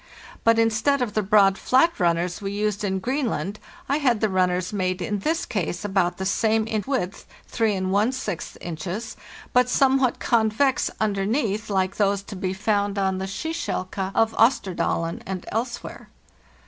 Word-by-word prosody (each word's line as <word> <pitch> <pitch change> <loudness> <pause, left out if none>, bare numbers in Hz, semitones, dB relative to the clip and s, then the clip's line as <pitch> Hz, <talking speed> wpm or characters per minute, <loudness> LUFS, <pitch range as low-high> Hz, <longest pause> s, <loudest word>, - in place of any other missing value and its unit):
But 230 0 +4
instead 225 +5 +2
of 215 -4 -4
the 215 - +1
broad, 195 -1 +4
flat 265 +5 +3
runners 175 +1 +1
we 195 -1 -3
used 210 0 -1
in 190 -2 0
Greenland, 215 - -2 0.3
I 280 - +1
had 250 -7 +2
the 220 - +1
runners 185 0 0
made 185 -2 -1
in 205 +3 -2
this 320 - -1
case 185 -3 -3
about 190 -3 +1
the 190 - -3
same 220 +2 +2
in 215 -2 -2
width 220 -8 -2 0.2
(3! 220 -3 +1 0.8
inches), 180 +7 -5 0.4
but 250 0 +4
somewhat 265 -1 +3
convex 235 +3 +2
underneath, 210 +1 0
like 190 -1 0
those 200 -1 +1
to 200 - -9
be 185 0 -2
found 205 +1 0
on 190 -1 0
the 190 - -3
"skikjelke" 195 - -3
of 225 0 +3
Osterdalen 185 -7 +1
and 185 -2 -4
elsewhere. 235 +2 -4
205 Hz, 150 wpm, -24 LUFS, 190-230 Hz, 0.8 s, But